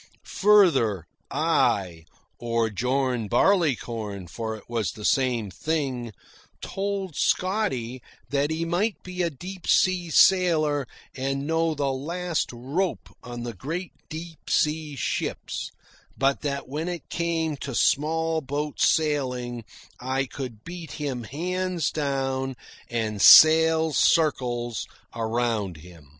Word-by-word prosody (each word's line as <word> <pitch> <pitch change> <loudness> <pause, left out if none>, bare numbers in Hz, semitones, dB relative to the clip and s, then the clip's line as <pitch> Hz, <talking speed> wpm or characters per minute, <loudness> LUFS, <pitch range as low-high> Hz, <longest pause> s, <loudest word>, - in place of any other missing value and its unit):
Further, 155 - +4 0.2
I 85 -5 +1 0.3
or 115 -1 0
John 125 +1 0
Barleycorn, 120 - +1
for 110 +5 -5
it 110 - -12
was 115 -6 -1
the 105 - -8
same 120 -6 +1
thing 135 - -2 0.5
told 195 -4 -3
Scotty 135 - 0 0.3
that 140 +1 +1
he 160 +1 -2
might 190 +6 0
be 180 0 -5
a 170 - +1
deep 180 +5 -9
sea 180 -2 +3
sailor 155 -6 +4 0.3
and 135 +1 -2
know 160 0 +1
the 140 -2 0
last 170 +5 -2
rope 140 +10 -3
on 120 -1 -7
the 120 -1 -5
great 165 - -5 0.2
deep 165 0 -8
sea 150 -1 +1
ships, - - -3 0.5
but 135 +1 +1
that 140 -2 -3
when 150 +5 -4
it 175 -2 -5
came 165 -2 -1
to 135 -2 -5
small 160 +4 +1
boat 145 +2 -4
sailing 125 -6 +1 0.4
I 130 +2 -1
could 125 -5 -7
beat 175 -1 -8
him 135 -6 -4
hands 180 - -2
down 135 -2 -2 0.3
and 110 -3 -2
sail 160 0 +8
circles 125 -9 +1 0.3
around 115 -5 -1
him. 80 -3 -15
140 Hz, 120 wpm, -25 LUFS, 120-165 Hz, 0.5 s, sail